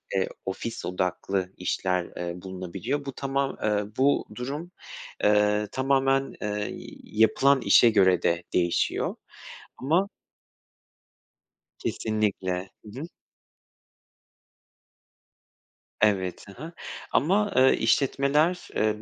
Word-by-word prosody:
eee, 95 Hz, -, +1 dB, 0.2 s
ofis 105 Hz, +4 st, -4 dB
odaklı 90 Hz, +1 st, -2 dB
işler, 90 Hz, 0 st, -1 dB
eee, 85 Hz, 0 st, -5 dB
bulunabiliyor. 95 Hz, +10 st, -4 dB
Bu 135 Hz, -, -4 dB
tamam 135 Hz, 0 st, -2 dB, 0.4 s
bu 140 Hz, +2 st, +3 dB
durum, 145 Hz, +8 st, -5 dB, 0.5 s
eee, 105 Hz, 0 st, +3 dB
tamamen, 135 Hz, 0 st, +1 dB
eee, 105 Hz, 0 st, -2 dB, 0.4 s
yapılan 110 Hz, +6 st, +3 dB
işe 120 Hz, -, +6 dB
göre 95 Hz, -5 st, +4 dB
de 85 Hz, 0 st, +1 dB
değişiyor 85 Hz, -1 st, +1 dB, 0.6 s
ama 170 Hz, +9 st, +1 dB, 1.7 s
Kesinlikle. 95 Hz, -4 st, -2 dB, 0.2 s
Hı 105 Hz, +5 st, -9 dB
hı. -, -, -4 dB, 3.0 s
Evet, 95 Hz, -4 st, +1 dB
hı -, -, -10 dB
hı, 165 Hz, -, -7 dB, 0.4 s
ama, 200 Hz, +7 st, +2 dB
eee, 130 Hz, +1 st, +6 dB
işletmeler, 140 Hz, +8 st, +2 dB
eee, 105 Hz, 0 st, +1 dB
110 Hz, 90 wpm, -26 LUFS, 95-135 Hz, 3.0 s, işe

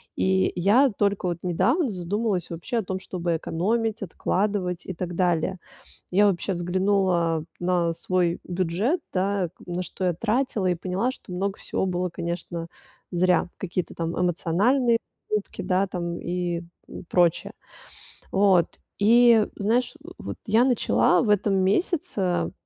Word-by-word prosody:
И 95 Hz, 0 st, +2 dB
я 210 Hz, +10 st, +4 dB
только 200 Hz, -2 st, +1 dB
вот 175 Hz, -2 st, -1 dB
недавно 225 Hz, -, +1 dB
задумалась 195 Hz, +1 st, -2 dB
вообще 170 Hz, +8 st, -4 dB
о 225 Hz, -, 0 dB
том, 190 Hz, 0 st, -4 dB
чтобы 175 Hz, -2 st, -2 dB
экономить, 220 Hz, +8 st, -1 dB
откладывать 190 Hz, -1 st, -1 dB
и 185 Hz, -, -3 dB
так 175 Hz, +1 st, -4 dB
далее. 175 Hz, 0 st, +1 dB, 0.5 s
Я 205 Hz, +3 st, +5 dB
вообще 195 Hz, 0 st, 0 dB
взглянула 175 Hz, -2 st, +1 dB
на 175 Hz, -1 st, +1 dB
свой 175 Hz, 0 st, 0 dB
бюджет, 185 Hz, -, 0 dB
да, 190 Hz, -1 st, 0 dB, 0.2 s
на 180 Hz, 0 st, -3 dB
что 185 Hz, +1 st, -4 dB
я 180 Hz, -, +2 dB
тратила 220 Hz, +1 st, 0 dB
и 180 Hz, -, +2 dB
поняла, 185 Hz, +7 st, -1 dB
что 260 Hz, -, -9 dB
много 195 Hz, +2 st, -2 dB
всего 190 Hz, -, -2 dB
было, 180 Hz, 0 st, -1 dB
конечно, 170 Hz, 0 st, -5 dB, 0.4 s
зря, 180 Hz, 0 st, +2 dB
какие-то 180 Hz, -1 st, -4 dB
там 165 Hz, +1 st, -3 dB
эмоциональные 205 Hz, -, +2 dB, 0.3 s
покупки, 210 Hz, -1 st, -3 dB
да, 190 Hz, +2 st, +1 dB
там 170 Hz, -2 st, -4 dB
и 175 Hz, -1 st, -2 dB, 0.5 s
прочее. 175 Hz, -2 st, +2 dB, 0.8 s
Вот 190 Hz, -4 st, +4 dB, 0.3 s
и 230 Hz, +1 st, +6 dB
знаешь, 235 Hz, +6 st, 0 dB, 0.2 s
вот -, -, -6 dB
я 225 Hz, +3 st, +4 dB
начала 240 Hz, -7 st, +3 dB
в -, -, 0 dB
этом 205 Hz, -1 st, +2 dB
месяце, 190 Hz, -, 0 dB
185 Hz, 135 wpm, -25 LUFS, 175-205 Hz, 0.8 s, и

